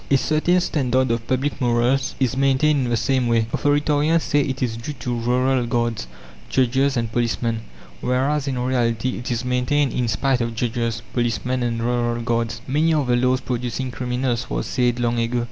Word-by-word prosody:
A 140 - +5
certain 155 +6 +2
standard 130 -7 +1
of 115 0 -2
public 135 +3 -1
morals 125 +3 +1
is 130 -2 +1
maintained 135 +1 +2
in - - -2
the 120 - +1
same 125 +3 +1
way. 115 -1 +3
Authoritarians 150 +2 +2
say 145 -1 +1
it 135 -1 -2
is 115 -3 -1
due 115 +6 -6
to 125 -2 -4
rural 125 +1 +1
guards, 115 - -1 0.4
judges, 130 +1 +2
and 115 -2 -1
policemen, 115 -1 -1 0.4
whereas 135 +3 0
in 135 -2 -1
reality 125 -1 0
it 120 - -6
is 120 0 -2
maintained 125 +3 +1
in 125 -1 0
spite 125 +4 +1
of 115 -1 -2
judges, 115 0 -2
policemen, 120 +1 -1
and 115 -1 -1
rural 120 0 0
guards. 115 -1 -1
"Many 155 +4 +2
are 150 -3 +1
the 125 -1 +2
laws 125 +1 +2
producing 125 +1 -3
criminals!" 125 -1 -2
was - - -2
said 125 -1 0
long 120 0 0
ago. 115 +1 0
125 Hz, 180 wpm, -22 LUFS, 120-135 Hz, 0.4 s, A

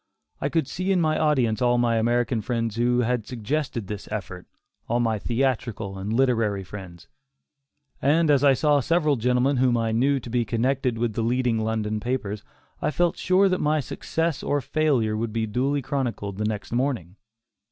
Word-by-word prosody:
I 140 - 0
could 160 -3 0
see 185 +2 -2
in 190 - +3
my 155 -2 +1
audience 130 -8 +2
all 120 0 +3
my 120 -1 +2
American 120 0 +1
friends 115 -1 -2
who 120 +1 +2
had 120 -2 -1
suggested 125 0 -3
this 100 +1 -7
effort; 95 -3 -6 0.4
all 120 +1 +1
my 115 -3 +1
theatrical 115 -5 -2
and 100 +3 -4
literary 115 -5 +1
friends; 90 -3 -10 0.9
and 155 +3 +3
as 140 -1 +3
I 140 -2 +6
saw 150 +1 +3
several 155 +1 +2
gentlemen 125 +3 +1
whom 125 -1 +3
I 115 -1 0
knew 135 +5 +2
to 120 - -9
be 120 0 +1
connected 125 +2 0
with 115 -1 -1
the 115 - -2
leading 120 0 +1
London 110 -1 -1
papers, 110 -3 -3 0.4
I - - +1
felt 175 +2 +1
sure 185 +2 +3
that 185 -1 0
my 150 +1 +2
success 160 +3 -2
or 145 - 0
failure 135 -5 +1
would 110 +1 -2
be 115 0 -1
duly 135 +6 -1
chronicled 115 -8 -3
next 105 -2 -4
morning. 120 - -1
120 Hz, 175 wpm, -25 LUFS, 110-140 Hz, 0.9 s, I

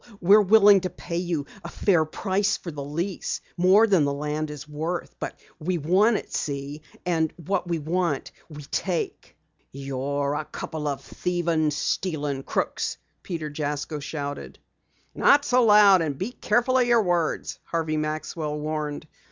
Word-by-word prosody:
We're 200 +4 +6
willing 205 -1 +6
to 185 - -2
pay 170 -1 -6
you 170 -5 -2 0.2
a - - -6
fair 175 -6 +2
price 195 +5 0
for 170 - -7
the 145 -2 -6
lease, 170 +7 -3 0.2
more 190 +5 +5
than 190 -8 +3
the 140 - +1
land 150 +2 -3
is 150 0 -8
worth. 160 +4 -4
But - - -5 0.2
we 175 +3 -1
want 190 +8 +3
it, - - -8
see? 140 +1 -3 0.2
And 160 -3 +1
what 180 +2 -2
we 170 -1 0
want 165 -1 -1 0.2
we 150 -1 -9
take." 175 +4 -3 0.4
"You're 140 +1 -2
a 150 +1 -3
couple 150 0 -5
of 140 -2 -2
thievin', 170 -3 0
stealin' 145 -2 -2
crooks!" - - -2 0.2
Peter 160 -4 -5
Jasko 150 0 -3
shouted. 145 -1 -6 0.6
"Not 285 +1 +4
so 250 -1 +4
loud, 205 -3 +7
and 150 -4 -2
be 195 - -3
careful 250 +2 +1
of 245 - +3
your 235 -2 +4
words," 175 -3 -1
Harvey 160 -2 -1
Maxwell 155 0 -3
warned. 150 -1 -3
160 Hz, 155 wpm, -25 LUFS, 150-185 Hz, 0.6 s, loud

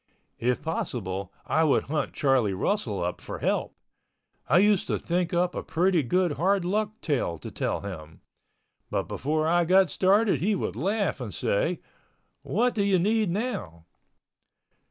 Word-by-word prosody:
If 125 +3 0
possible 100 - -3
I 160 - +2
would 150 -4 +3
hunt 150 +2 -2
Charlie 130 -8 +2
Russell 105 - -1
up 90 +1 -3
for - - -6
help. - - -1 0.7
I 150 - +5
used 205 0 +4
to - - 0
think 175 0 -1
up 180 +1 +1
a - - -3
pretty 180 0 +1
good 180 +6 +1
hard 190 +3 +2
luck 215 +3 -1
tale 125 - -1
to - - -9
tell - - -2
him. 80 -5 -8 0.7
But - - 0
before 155 +3 -1
I 175 +1 +3
got 185 -1 +4
started 200 +5 +3
he 205 +3 +1
would 175 - -3
laugh 200 - -1
and - - -5
say, - - 0 0.6
"What 245 0 +1
do 210 - 0
you 200 -1 +3
need 210 +3 +2
now?" 185 - -4
175 Hz, 155 wpm, -27 LUFS, 125-200 Hz, 0.7 s, I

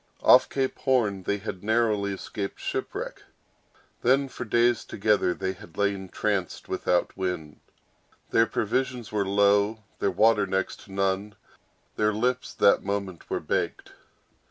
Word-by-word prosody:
Off - - +7
Cape 135 -1 -2
Horn 115 -8 +1
they 100 +2 -1
had 100 -2 -7
narrowly 110 -2 +1
escaped 100 +1 -5
shipwreck; - - -4 0.8
then, 135 +3 +3
for 125 - -6
days 120 +2 +2
together, 105 -3 +1
they 95 - -2
had 85 -3 -15
lain 100 -2 0
tranced 100 -3 -2
without 90 - 0
wind; 90 -5 -4 0.7
their 115 0 +4
provisions 125 +1 -2
were 105 -2 0
low; 100 +2 +3 0.2
their 100 - +1
water 105 +2 +3
next 95 0 -2
to - - -15
none; 100 +2 -1 0.6
their 105 0 +2
lips 125 +4 -1
that 100 - +4
moment 100 -3 -4
were - - -1
baked. - - -2
100 Hz, 135 wpm, -26 LUFS, 95-115 Hz, 0.8 s, Off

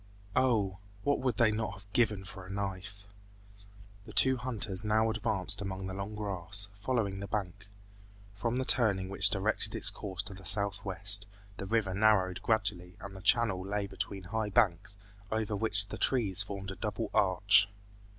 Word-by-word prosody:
Oh! 110 -7 +1 0.2
what 145 - +1
would 130 -4 -1
they 115 -3 +4
not 105 -2 -2
have 100 +1 -16
given 105 -5 +1
for 95 0 -9
a 90 - -12
knife! 100 0 -5 1.0
The - - -11
two 130 0 +7
hunters 115 -6 -3
now 110 +1 +2
advanced 105 -3 0
among 95 -1 -5
the 95 - -5
long 100 +2 -5
grass, 100 -1 -3
following 100 -2 -2
the 100 - -6
bank. 100 0 -4 0.7
From 115 +4 -2
the 130 0 -1
turning 100 -8 +2
which 100 - +6
directed - - 0
its - - +1
course 95 0 -5
to 105 - -6
the 95 0 -13
southwest, 100 0 +2 0.3
the 95 - -6
river 110 -3 0
narrowed 95 -3 +2
gradually 100 -5 -1
and 100 0 -9
the 95 - -10
channel 105 -3 +2
lay 100 +1 -2
between 100 0 -5
high 105 +3 -3
banks, 100 -1 +1 0.3
over 110 -1 -1
which 105 -1 +1
the - - -7
trees 100 -8 +3
formed 100 -1 -6
a - - -7
double 105 0 -4
arch. 100 +1 +4
100 Hz, 170 wpm, -31 LUFS, 95-110 Hz, 1.0 s, two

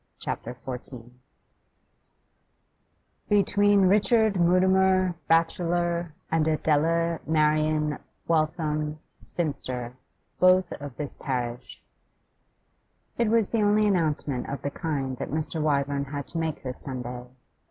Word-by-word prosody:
CHAPTER 125 - -5
XIV 125 -2 -8 2.2
'Between 205 0 +4
Richard 210 +3 +4
Mutimer, 185 +1 +3
bachelor, 170 0 +1 0.2
and 160 -1 +2
Adela 165 +2 +1
Marian 155 -1 +2 0.3
Waitham, 155 -1 0 0.3
spinster, 130 -7 -4 0.5
both 185 0 +4
of 145 -4 -8
this 145 -2 -5
parish' 125 -2 -4 1.4
It 235 - +3
was 225 -2 +2
the 230 - 0
only 210 +1 +3
announcement 155 -9 0
of 140 -1 -5
the 140 - -2
kind 135 -6 -3
that - - -5
Mr. 155 +2 -3
Wyvern 140 -1 0
had 140 0 -5
to 165 - -3
make 160 -2 -3
this 130 -1 -6
Sunday. 125 -2 -6
155 Hz, 105 wpm, -26 LUFS, 140-180 Hz, 2.2 s, Between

